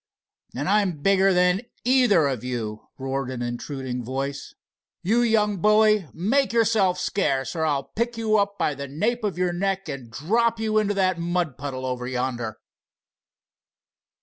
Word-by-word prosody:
"And - - -3
I'm 195 -8 +1
bigger 195 0 +4
than 180 +1 +3 0.2
either 245 - +4
of 130 -5 -3
you!" 115 -4 -4
roared 135 -1 -3
an 125 -2 -4
intruding 125 +1 -4
voice. 135 +3 -4 0.5
"You 225 +6 +3
young 215 -3 +2
bully, 210 -1 +4
make 250 +11 +1
yourself 215 -5 +3
scarce, 140 -9 -1
or 160 -1 0
I'll 140 -2 0
pick 235 - -3
you 215 -1 +2
up 200 0 -1
by 150 - 0
the 140 0 -6
nape 215 - -1
of 200 -4 -2
your 180 -1 0
neck 195 +1 -1
and 135 -5 -6
drop 225 - 0
you 215 -1 +1
into 205 -1 0
that 185 -2 +1
mud 170 -4 -1
puddle 130 -2 -5
over 125 -1 -3
yonder!" 125 -3 -3
180 Hz, 155 wpm, -24 LUFS, 135-210 Hz, 0.5 s, bigger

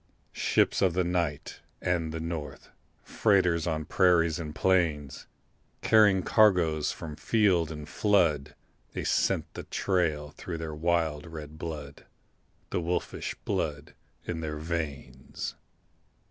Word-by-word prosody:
Ships - - +2
of 95 -3 +3
the 90 +1 +2
night 85 -4 -2 0.2
and 85 -3 -1
the 80 - -4
north, 80 -2 -6 0.3
Freighters 90 -6 +2
on 80 -2 -1
prairies 85 -3 +3
and 75 -2 -6
plains, 85 -7 +1 0.6
Carrying 105 -4 +5
cargoes 85 -8 +3
from 80 -3 -7
field 90 -2 +2
and 75 -1 -7
flood 75 -8 +2 0.4
They - - -3
scent - - 0
the - - -6
trail 80 -6 0
through 85 +2 -6
their 80 -1 -5
wild 80 -1 0
red 80 -1 -9
blood, 75 -4 -7 0.6
The - - 0
wolfish 85 +2 -3
blood 75 -1 -2 0.3
in 85 - -3
their 75 -1 -4
veins. 75 -5 -5
80 Hz, 120 wpm, -28 LUFS, 75-90 Hz, 0.6 s, Carrying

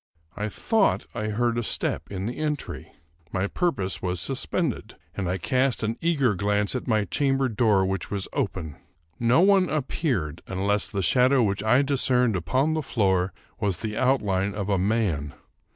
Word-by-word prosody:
I 105 +1 -3
thought 220 - +1
I 110 - -3
heard 120 +2 0
a - - -2
step - - -1
in 95 -1 -4
the 120 - -3
entry. 150 -2 -4 0.4
My 95 0 0
purpose 100 - -1
was 90 -1 -1
suspended, 135 - -1 0.2
and 95 -3 -3
I 90 - 0
cast 130 +6 0
an 110 +1 -1
eager 145 -9 +2
glance 105 +1 0
at 130 - -4
my 110 -3 +2
chamber 135 +5 +1
door, 105 -4 +2
which 95 0 -2
was 100 -2 -3
open. 80 -7 -3 0.4
No 120 +6 +4
one 190 -1 +4
appeared, 125 - -2
unless 100 +2 0
the 100 -2 -3
shadow 125 +6 +4
which 100 -1 -1
I 125 +5 +4
discerned 125 -4 +2
upon 130 - +1
the 160 - 0
floor 95 -8 +1 0.3
was 100 -3 0
the 110 -1 -4
outline 105 -7 +1
of 100 -1 -3
a 100 -2 +2
man. 95 -8 0
110 Hz, 170 wpm, -25 LUFS, 95-130 Hz, 0.4 s, No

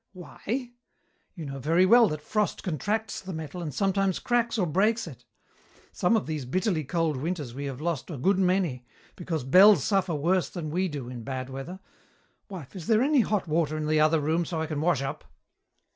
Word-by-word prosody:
"Why! 235 +7 -5 0.6
You 165 -4 -7
know 135 -1 -6
very 165 +7 +3
well 230 +3 +7
that 150 0 -5
frost 210 +4 -1
contracts 205 - -2
the 190 0 -7
metal 160 +2 -6
and 160 -3 -4
sometimes 195 +3 +1
cracks 240 -1 0
or 190 - +2
breaks 210 +8 +1
it. 150 -8 -11 0.7
Some 180 +6 +2
of 215 - -2
these 155 -4 -4
bitterly 180 - 0
cold 160 0 -1
winters 150 -3 -4
we 140 +3 -5
have 135 -2 -5
lost 165 -1 -3
a 160 - -5
good 190 +9 +2
many, 180 -9 +1 0.3
because 165 -5 -3
bells 190 +10 +7
suffer 190 -5 +1
worse 175 +5 +1
than 160 -4 -5
we 185 +4 0
do 145 -7 -6
in 125 -1 -7
bad 130 +2 -5
weather. 135 +8 -7 0.7
Wife, 180 -5 -9
is 175 -4 -8
there 225 +1 +4
any 285 -1 +4
hot 210 -5 -1
water 155 -1 0
in 155 - -3
the 155 0 +2
other 155 +1 +4
room, 160 +4 0
so 165 -1 -4
I 160 - -1
can 155 -2 -3
wash 160 -5 +1
up?" 135 - -5
170 Hz, 200 wpm, -27 LUFS, 150-195 Hz, 0.7 s, well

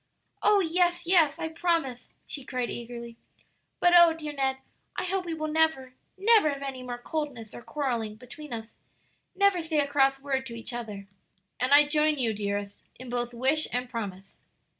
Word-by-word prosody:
"Oh, 410 -1 +5
yes, 350 0 +1
yes, 330 -4 +4
I 325 - -3
promise!" 320 -7 -1 0.2
she 280 - -6
cried 250 -2 -3
eagerly; 235 -1 -7 0.6
"but, 350 0 +4
oh, 345 -1 +8
dear 305 -2 -6
Ned, 265 -2 0 0.4
I - - -1
hope 370 0 -1
we 335 -1 -3
will 310 -1 -3
never, 310 -5 +1 0.2
never 420 -4 +5
have 280 0 -6
any 265 -2 -5
more 245 -1 -5
coldness 250 -5 -5
or - - -9
quarrelling 240 -6 -3
between 250 +6 -11
us, 225 -1 -6 0.6
never 400 -2 +3
say 320 -1 -2
a 290 - +3
cross 270 -1 +2
word 270 -1 -2
to 235 - -7
each 230 +2 -6
other." 215 -4 -6 0.5
"And 255 +2 0
I 290 +1 +8
join 300 0 +2
you, 235 -4 +1
dearest, 205 -1 -3
in 255 0 -10
both 240 0 -2
wish 265 +6 +1
and 250 0 -2
promise." 195 -5 -6
270 Hz, 180 wpm, -28 LUFS, 240-320 Hz, 0.6 s, oh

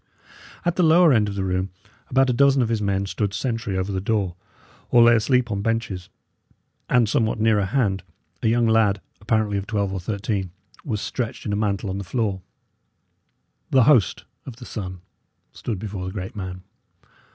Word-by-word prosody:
At 175 0 0
the - - +3
lower 165 -1 +6
end 105 -3 +3
of 100 - -5
the 95 - -1
room 95 0 -1 0.4
about 135 +1 +3
a 125 - +2
dozen 135 +1 +4
of 115 - -1
his 115 -2 0
men 100 -1 0
stood 100 0 -2
sentry 115 -3 -2
over 95 +2 -2
the 95 -1 -2
door 100 -4 -1 0.5
or 120 -1 +6
lay 120 0 +7
asleep 120 +1 +2
on 100 -1 -1
benches; 105 -5 -2 0.8
and 125 -3 +4
somewhat 110 0 +1
nearer 110 -2 +3
hand, 100 -4 0 0.4
a - - +1
young 120 +1 +3
lad, 110 -3 +3 0.2
apparently 105 -1 +1
of 100 - -7
twelve 100 -3 -1
or 95 - -2
thirteen, 100 0 -2 0.3
was 110 -6 -3
stretched 120 -3 -4
in 105 - -1
a - - +1
mantle 100 -1 -1
on 95 - -3
the - - -4
floor. 100 0 -2 1.3
The 130 -2 +5
host 110 -9 +3 0.2
of 130 - -7
the 125 +1 -11
Sun 95 -6 -6 0.5
stood 115 -5 -4
before 95 -2 -5
the - - -4
great 95 -2 -6
man. 95 -2 -6
105 Hz, 185 wpm, -23 LUFS, 95-115 Hz, 1.3 s, lay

